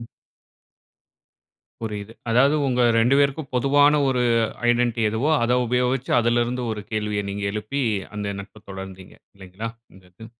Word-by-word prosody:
ம். 115 - -9 1.8
புரியுது. 105 -1 -5 0.2
அதாவது 135 +5 +4
உங்க 125 -2 +1 0.2
2 120 +4 +4
பேருக்கும் 140 0 0
பொதுவான 145 +3 +4
ஒரு 125 -2 +1 0.5
ஐடென்ட்டி 120 -1 +1
எதுவோ, 115 +8 0
அத 120 +1 +2
உபயோகிச்சு 125 +2 0
அதிலிருந்து 120 +1 0
ஒரு 105 -1 -6
கேள்விய 105 -1 -1
நீங்க 100 0 -4
எழுப்பி 110 +7 -3 0.3
அந்த 100 -1 -3
நட்ப 105 +2 -14
தொடர்ந்தீங்க, 95 -1 -9 0.2
இல்லைங்களா? 95 +4 -7 0.3
அந்த 95 -1 -18
இது. 110 +4 -12
115 Hz, 135 wpm, -23 LUFS, 105-125 Hz, 1.8 s, அதாவது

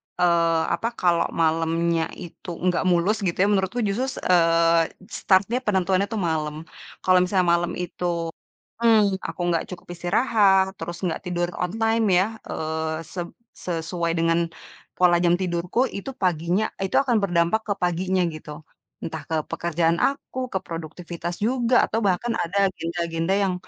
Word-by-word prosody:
eee, 170 -2 +3
apa, 230 - -1
kalau 175 -2 +2
malamnya 165 +1 +1 0.2
itu 175 +1 -11 0.2
nggak 180 -1 +2
mulus, 180 +5 +2
gitu 170 - -1
ya, - - +3
menurutku 195 +4 0
justru, 240 +7 -1 0.2
eee, 165 -1 +4 0.2
start-nya, 205 +6 +2
penentuannya 190 -1 +1
itu 225 - -5
malam, 150 -1 -2 0.5
kalau 185 0 +5
misalnya 180 -1 +1
malam 175 0 +1
itu 180 0 -5 0.8
mhm, 210 -4 +4
aku - - -6
nggak 165 -1 +1
cukup 175 - -9
istirahat, 195 +1 +3
terus 175 0 -5
nggak 165 - -1
tidur 175 -1 -1 0.2
on 180 - -2
time 225 0 +2
ya, 185 - +4 0.2
eee, 160 0 -3
sep 175 -2 -4 0.4
sesuai 170 0 -2
dengan 165 0 +2 0.6
pola 180 -1 +4
jam 175 0 +4
tidurku, 175 +4 -2 0.2
itu 235 +7 -5
paginya 175 +2 +1 0.2
itu 190 - -2
akan 245 -4 +2
berdampak 175 +4 +2
ke 205 - +1
paginya, 180 +1 +1
gitu. 150 -1 -9 0.5
Entah, 160 -1 -5
ke 160 - 0 0.2
pekerjaan 165 0 +1
aku, 275 -2 -3
ke 190 - +1
produktivitas 170 +1 -6
juga, 245 0 +1
atau 225 - -1
bahkan 230 +6 0
ada 180 +4 -3
agenda-agenda 170 +1 -2
yang 185 - 0
175 Hz, 145 wpm, -24 LUFS, 165-195 Hz, 0.8 s, kalau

